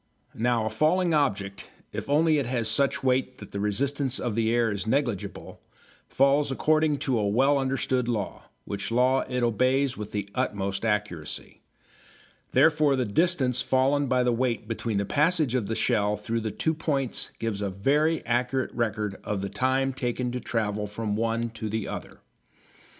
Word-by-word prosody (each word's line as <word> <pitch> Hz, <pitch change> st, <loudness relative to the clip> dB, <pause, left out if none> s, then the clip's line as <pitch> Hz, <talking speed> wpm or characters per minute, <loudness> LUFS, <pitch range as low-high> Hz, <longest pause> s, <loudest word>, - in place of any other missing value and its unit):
Now 115 Hz, -1 st, +1 dB
a -, -, 0 dB
falling 175 Hz, +2 st, +2 dB
object, 100 Hz, -9 st, -1 dB, 0.2 s
if -, -, -5 dB
only 155 Hz, +1 st, +4 dB
it 135 Hz, -, -2 dB
has 120 Hz, -3 st, -1 dB
such 140 Hz, +5 st, +1 dB
weight 130 Hz, 0 st, +1 dB
that 100 Hz, -, -11 dB
the 100 Hz, -, -4 dB
resistance 130 Hz, +6 st, 0 dB
of 120 Hz, -3 st, -2 dB
the 110 Hz, +1 st, +1 dB
air 115 Hz, -1 st, +2 dB
is 100 Hz, +1 st, -3 dB
negligible, 120 Hz, -5 st, -2 dB, 0.5 s
falls 140 Hz, +1 st, +3 dB
according 155 Hz, +2 st, +2 dB
to 125 Hz, -4 st, +1 dB
a 105 Hz, -, +1 dB
well 135 Hz, +7 st, +3 dB
understood 130 Hz, -2 st, 0 dB
law, 110 Hz, -5 st, -3 dB, 0.2 s
which 100 Hz, -1 st, -4 dB
law 125 Hz, +3 st, +3 dB
it 125 Hz, -1 st, -1 dB
obeys 130 Hz, +3 st, +2 dB
with 105 Hz, 0 st, -6 dB
the 105 Hz, -2 st, -3 dB
utmost 100 Hz, 0 st, -2 dB
accuracy. 105 Hz, -8 st, -3 dB, 0.9 s
Therefore 150 Hz, -3 st, +4 dB
the 130 Hz, -2 st, 0 dB
distance 130 Hz, -, +1 dB
fallen 135 Hz, +3 st, +2 dB
by 125 Hz, -1 st, +2 dB
the 125 Hz, -1 st, +2 dB
weight 120 Hz, -2 st, -1 dB
between 115 Hz, -1 st, -2 dB
the 100 Hz, -, 0 dB
passage 155 Hz, -, +2 dB
of 120 Hz, -6 st, 0 dB
the 115 Hz, -, -2 dB
shell 105 Hz, -1 st, +1 dB
through 115 Hz, +3 st, -2 dB
two 160 Hz, +9 st, -1 dB
points 140 Hz, -5 st, -2 dB
gives 110 Hz, -3 st, -3 dB
a 100 Hz, -, -1 dB
very 145 Hz, -, +1 dB
accurate 125 Hz, +2 st, 0 dB
record 105 Hz, -4 st, -2 dB
of 105 Hz, -2 st, -2 dB
the 100 Hz, -, -3 dB
time 130 Hz, +6 st, +1 dB
taken 125 Hz, -1 st, -2 dB
to 125 Hz, -, -3 dB
travel 105 Hz, -3 st, -2 dB
from 105 Hz, 0 st, -3 dB
one 115 Hz, +1 st, -1 dB
to 110 Hz, -1 st, -5 dB
the 110 Hz, 0 st, -2 dB
other. -, -, -7 dB
120 Hz, 170 wpm, -26 LUFS, 105-135 Hz, 0.9 s, only